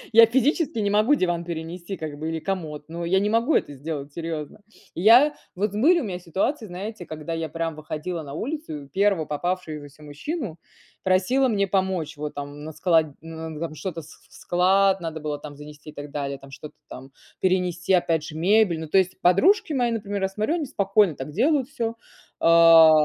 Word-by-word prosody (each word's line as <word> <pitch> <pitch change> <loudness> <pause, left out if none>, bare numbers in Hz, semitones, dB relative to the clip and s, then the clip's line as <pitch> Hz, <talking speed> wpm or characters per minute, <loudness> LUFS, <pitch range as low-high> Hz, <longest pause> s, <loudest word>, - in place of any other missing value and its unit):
Я 230 +1 +9
физически 265 +3 +1
не 205 -1 +1
могу 215 +7 +4
диван 175 -8 0
перенести 170 +3 -6
как 150 -3 -6
бы 160 +1 -4
или 165 - -2
комод, 155 -5 -4
но 170 +1 -5
я 190 +3 +2
не 205 +1 0
могу 230 +7 +2
это 145 - 0
сделать, 145 0 -6
серьёзно. 160 0 -5 0.3
И 170 - -4
я 245 +8 +7 0.2
вот 200 +2 -1
были 315 +12 +4
у 270 - -3
меня 180 -3 -4
ситуации, 195 - -2
знаете, 185 +1 -7
когда 155 +1 -6
я 165 -1 -2
прям 165 0 -3
выходила 155 +2 -5
на 140 -1 -9
улицу 235 - -5
и - - -18
первого 195 0 +1
попавшегося 155 -2 -4
мужчину 170 - -5 0.5
просила 195 +9 +3
мне 200 -3 +1
помочь. 185 -5 -1
Вот, 150 0 -5
там, 145 +1 -7
на 160 - -7
склад, 160 0 +3 0.2
н 160 -1 -7
на 150 - -8
там 165 -2 -4
что-то 170 0 -5
вс 150 - -15
вс - - -18
в - - -19
склад 190 +2 +3
там 150 -3 -5
занести 150 +1 -11
и - - -17
так 145 0 -8
далее, 140 -1 -4
там 135 0 -14
что-то 145 +2 -10
там 135 +1 -11 0.3
перенести, 180 -1 +1
опять 165 -3 +2
же, 155 -1 -8
мебель. 185 -1 +3
Ну, 160 - -6
то 190 - +4
есть 185 0 0
подружки 305 - +4
мои, 245 -2 +1
например, 205 -3 -3
я 190 - +2
смотрю, 215 - -1
они 305 -4 -2
спокойно 200 -5 +2
так 135 +2 -7
делают 270 - +2
всё. 230 -4 -3 0.5
А 165 -1 +8
175 Hz, 200 wpm, -24 LUFS, 155-205 Hz, 0.5 s, Я